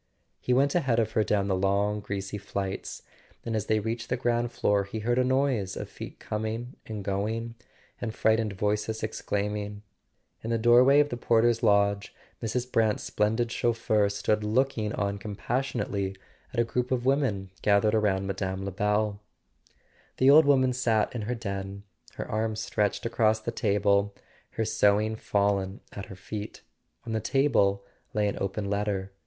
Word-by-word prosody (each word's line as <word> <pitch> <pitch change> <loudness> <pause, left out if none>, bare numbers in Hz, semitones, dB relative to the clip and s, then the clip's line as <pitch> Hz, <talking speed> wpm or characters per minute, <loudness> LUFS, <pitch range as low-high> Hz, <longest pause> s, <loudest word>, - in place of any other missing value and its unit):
He - - -3
went 140 +3 +3
ahead 135 -9 +2
of 110 -1 +1
her 110 -1 +2
down 100 -2 +1
the 95 - +1
long 100 +2 +1
greasy 100 0 -4
flights, 100 -1 -4 0.4
and 115 -1 -2
as 105 -2 -2
they 110 0 +2
reached 115 +2 -4
the 125 - 0
ground 120 -1 0
floor 105 -4 +1
he 110 +2 -5
heard 120 +3 +1
a - - +4
noise 130 -7 +1
of - - -5
feet - - -9
coming 110 +4 -4
and 105 -2 -5
going, 110 +4 -2 0.5
and 115 - -2
frightened 110 -1 +1
voices 105 +2 -1
ex¬ 110 - -4
claiming. 105 0 -2 0.6
In 115 - -4
the 115 - +1
doorway 125 +5 +6
of 145 - 0
the 120 - -4
porter's 115 0 +3
lodge 100 0 +2 0.3
Mrs. 125 +2 -2
Brant's 110 -2 +2
splendid 110 +3 0
chauffeur 110 -4 +1
stood 105 +1 0
looking 110 0 +1
on 100 -2 -2
compas¬ 100 0 -7 0.3
sionately 95 -5 -2 0.3
at 125 - -3
a - - +5
group 125 +2 -2
of 125 -1 0
women 130 -9 +1
gathered 105 +1 +3
about 105 -3 +2
Mme. 95 0 -3
Lebel. 105 +1 0 1.0
The 130 +1 +6
old 155 +2 +8
woman 130 -3 +4
sat 115 -4 +1
in 120 - -3
her 125 - 0
den, 100 -3 -5 0.3
her - - -5
arms 110 0 -1
stretched 105 -1 -1
across 110 -2 +2
the 115 - -4
table, 100 -2 +1 0.4
her 110 - -1
sewing 110 0 +2
fallen 100 -2 0
at 100 - -7
her 95 - -9
feet. 105 +3 -7 0.4
On 115 - -5
the 110 - +1
table 100 -6 +2 0.3
lay 105 -1 +2
an 100 - -3
open 100 +1 -2
letter. 100 -1 -1
110 Hz, 170 wpm, -28 LUFS, 100-115 Hz, 1.0 s, old